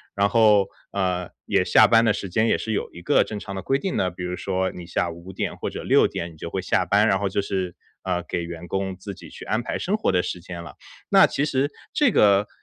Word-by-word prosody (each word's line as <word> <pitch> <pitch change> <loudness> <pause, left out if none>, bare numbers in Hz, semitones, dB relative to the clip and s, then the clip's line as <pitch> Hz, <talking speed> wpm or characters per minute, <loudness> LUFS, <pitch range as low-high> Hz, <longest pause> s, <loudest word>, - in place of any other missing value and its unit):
然 100 0 +2
后， 105 -3 +5 0.3
呃， 90 -2 -1 0.2
也 - - +2
下 - - +6
班 115 0 +5
的 110 - +4
时 100 - -5
间 110 +6 +2
也 - - +3
是 110 - -4
有 - - -2
一 85 - -10
个 - - +3
正 105 - -6
常 100 -1 -7
的 95 - -4
规 135 +9 +1
定 190 +5 -3
的， 90 - +1
比 90 +1 -8
如 90 0 -3
说 95 -1 -1
你 90 - -9
下 85 0 -1
午 85 +1 -12
5:00 95 0 -4
或 - - -3
者 - - -7
6:00 85 0 +2
你 80 - -16
就 85 - -6
会 95 - -3
下 90 0 +1
班， 100 +3 +3
然 95 - +2
后 100 - 0
就 95 +1 0
是， 95 -3 -3 0.3
呃， 90 -2 -1
给 85 - -3
员 85 0 -8
工 95 -1 -2
自 95 +2 -8
己 - - -12
去 - - -11
安 110 - 0
排 - - -3
生 200 +4 -1
活 215 - +1
的 90 - +2
时 90 - -4
间 85 0 -8
了。 - - -11 0.3
那 - - +7
其 140 - -1
实 140 -1 +1 0.2
这 290 -3 +4
个 100 - +4
95 Hz, 270 characters per minute, -24 LUFS, 90-105 Hz, 0.3 s, 那